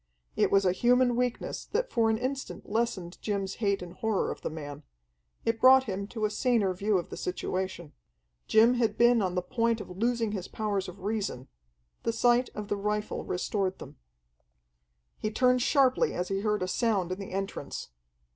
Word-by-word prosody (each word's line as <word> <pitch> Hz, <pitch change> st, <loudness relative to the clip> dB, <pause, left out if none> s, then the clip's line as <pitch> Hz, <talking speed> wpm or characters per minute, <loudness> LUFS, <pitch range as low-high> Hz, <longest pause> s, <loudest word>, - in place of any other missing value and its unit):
It -, -, +3 dB
was 195 Hz, -1 st, +3 dB
a 180 Hz, -, +4 dB
human 245 Hz, +5 st, +3 dB
weakness 245 Hz, 0 st, -2 dB
that -, -, 0 dB
for 225 Hz, -2 st, +2 dB
an 220 Hz, -, +2 dB
instant 265 Hz, +3 st, -4 dB
lessened 205 Hz, -6 st, -2 dB
Jim's 200 Hz, -2 st, -2 dB
hate 200 Hz, -3 st, +1 dB
and 175 Hz, -1 st, -9 dB
horror 220 Hz, -3 st, -1 dB
of -, -, -7 dB
the -, -, -3 dB
man. 145 Hz, -2 st, -7 dB, 0.6 s
It 225 Hz, 0 st, 0 dB
brought 260 Hz, 0 st, +8 dB
him 200 Hz, -4 st, -4 dB
to 220 Hz, 0 st, -2 dB
a 210 Hz, -, 0 dB
saner 220 Hz, -4 st, +2 dB
view 200 Hz, +2 st, +1 dB
of 175 Hz, -, -4 dB
the -, -, -4 dB
situation. 185 Hz, -3 st, -3 dB, 0.5 s
Jim 225 Hz, +3 st, +6 dB
had 240 Hz, -3 st, 0 dB
been 240 Hz, -1 st, +5 dB
on 185 Hz, -2 st, -1 dB
the 180 Hz, -, 0 dB
point 230 Hz, +1 st, 0 dB
of 185 Hz, -, -8 dB
losing 230 Hz, +1 st, 0 dB
his 190 Hz, -4 st, -4 dB
powers 200 Hz, -3 st, -2 dB
of 180 Hz, +2 st, -12 dB
reason. 200 Hz, -, -3 dB, 0.5 s
The 230 Hz, -, -1 dB
sight 240 Hz, +2 st, +3 dB
of 210 Hz, -1 st, -5 dB
the 205 Hz, -, -1 dB
rifle 210 Hz, +1 st, -2 dB
restored 190 Hz, +1 st, -1 dB
them. -, -, -11 dB, 1.2 s
He 215 Hz, -, -1 dB
turned 250 Hz, +3 st, +3 dB
sharply 275 Hz, -, +3 dB
as 180 Hz, -, -2 dB
he 195 Hz, 0 st, 0 dB
heard 210 Hz, -1 st, 0 dB
a -, -, -1 dB
sound 195 Hz, -3 st, 0 dB
in 185 Hz, -, -3 dB
the 195 Hz, -, -7 dB
entrance. 195 Hz, -7 st, -4 dB
210 Hz, 185 wpm, -29 LUFS, 190-235 Hz, 1.2 s, brought